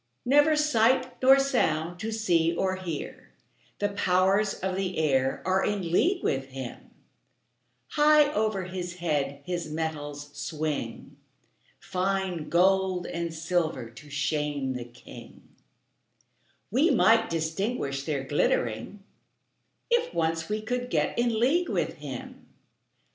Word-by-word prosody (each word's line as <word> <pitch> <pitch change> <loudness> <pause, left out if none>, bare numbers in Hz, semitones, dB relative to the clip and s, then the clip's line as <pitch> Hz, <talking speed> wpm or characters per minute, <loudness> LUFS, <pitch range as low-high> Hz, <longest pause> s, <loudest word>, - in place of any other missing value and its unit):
Never 290 +4 +5
sight 255 -3 +2
nor 265 +1 +7
sound 175 - 0
to 220 +2 -3
see 170 -7 +1
or 185 +1 0
hear; 170 -5 -6 0.4
The 205 - 0
powers 195 +1 +2
of 190 0 -3
the 190 -1 -2
air 135 -4 +1
are 190 +1 +2
in 195 -5 -1
league 355 - +2
with 135 -1 -1
him; 130 -2 -8 1.0
High 300 0 +5
over 215 -3 0
his 180 -1 -5
head 145 -5 -2
his 175 -3 -3
metals 145 -2 -4
swing, 150 +1 -4 0.6
Fine 185 -3 -2
gold 185 0 +2
and 170 0 -3
silver 160 -7 -2
to 145 +5 -14
shame 145 -1 -1
the 125 -1 -5
king; 120 0 -14 1.2
We 275 - +3
might 225 -4 +4
distinguish 160 - -2
their 140 -3 -2
glittering, 135 - -1 0.9
If 480 0 +1
once 165 +1 0
we 215 0 -2
could 245 +2 -2
get - - 0
in 235 -2 +1
league 325 +9 +2
with - - -1
him. - - -8
180 Hz, 120 wpm, -27 LUFS, 150-220 Hz, 1.2 s, nor